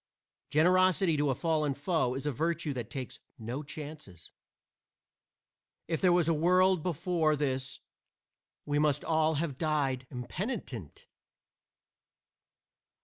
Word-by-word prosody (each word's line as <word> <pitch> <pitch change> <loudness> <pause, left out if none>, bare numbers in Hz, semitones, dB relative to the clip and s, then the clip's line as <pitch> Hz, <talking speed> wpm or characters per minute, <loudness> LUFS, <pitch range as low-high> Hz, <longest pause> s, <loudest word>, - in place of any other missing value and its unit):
Generosity 185 +2 +4
to 145 0 +1
a 130 - +1
fallen 155 -2 0
foe 145 -4 0
is 135 - -5
a 150 - +1
virtue 160 +2 -1
that 120 -4 -5
takes 130 -3 -6 0.2
no 120 +5 -4
chances. 145 - -8 1.6
If 165 -1 -1
there 185 - +5
was 175 -2 +3
a 165 - +4
world 180 +3 +4
before 165 -1 +1
this 130 -3 -2 0.9
we 145 0 0
must 150 -2 +1
all 160 -1 +2
have 145 -3 -2
died 140 -5 0
impenitent. 130 - -5
150 Hz, 115 wpm, -30 LUFS, 135-170 Hz, 1.6 s, there